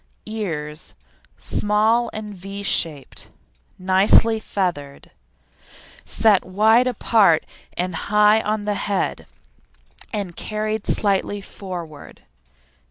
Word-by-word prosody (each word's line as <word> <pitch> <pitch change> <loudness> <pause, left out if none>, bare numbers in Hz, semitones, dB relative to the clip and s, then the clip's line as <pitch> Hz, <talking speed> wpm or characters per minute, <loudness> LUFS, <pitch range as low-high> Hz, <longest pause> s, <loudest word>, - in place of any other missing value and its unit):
EARS 160 -9 -5 0.4
Small 220 +3 +1
and 210 -1 -7
V 195 +2 -8
shaped, 155 -7 -2 0.5
nicely 195 +4 +4
feathered, 170 -10 -4 0.9
set 210 -4 +3
wide 220 +6 +3
apart 215 -9 +3 0.3
and 180 0 -2
high 210 +5 +3
on 210 -1 -2
the 210 - 0
head 200 0 -2 0.8
and 200 -6 -4
carried 215 0 -3
slightly 205 0 0
forward. 175 -6 -9
205 Hz, 90 wpm, -21 LUFS, 180-215 Hz, 0.9 s, nicely